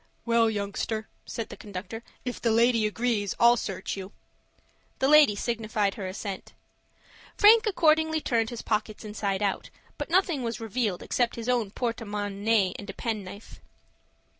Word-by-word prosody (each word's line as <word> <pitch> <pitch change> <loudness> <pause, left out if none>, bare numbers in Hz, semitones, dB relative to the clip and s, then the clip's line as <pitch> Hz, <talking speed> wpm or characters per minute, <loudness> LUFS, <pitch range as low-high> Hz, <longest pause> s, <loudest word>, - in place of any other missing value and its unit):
"Well, 230 -1 +3
youngster," 215 +1 -3 0.2
said 230 - -5
the - - -8
conductor, 205 +2 -7 0.2
"if 250 - -4
the 235 - +2
lady 230 -1 +3
agrees, 210 -2 -1
I'll 235 +1 +7
search 195 -5 -4
you." 195 0 -7 0.9
The 265 - +1
lady 295 -7 +7
signified 215 -2 -1
her 195 -3 -5
assent. 190 0 -6 0.8
Frank 440 +1 +7
accordingly 315 -4 +3
turned 230 -6 0
his 240 -2 -7
pockets 215 0 -2
inside 205 -2 -2
out, 200 -2 -1 0.3
but - - -4
nothing 345 -5 +2
was 230 -1 -3
revealed 225 -4 -2
except 240 -2 0
his 230 0 -6
own 240 -5 +1
porte 230 +2 -3
monnaie 205 -1 0
and 205 - -9
a - - -5
penknife. 210 -2 -6
225 Hz, 150 wpm, -27 LUFS, 205-240 Hz, 0.9 s, I'll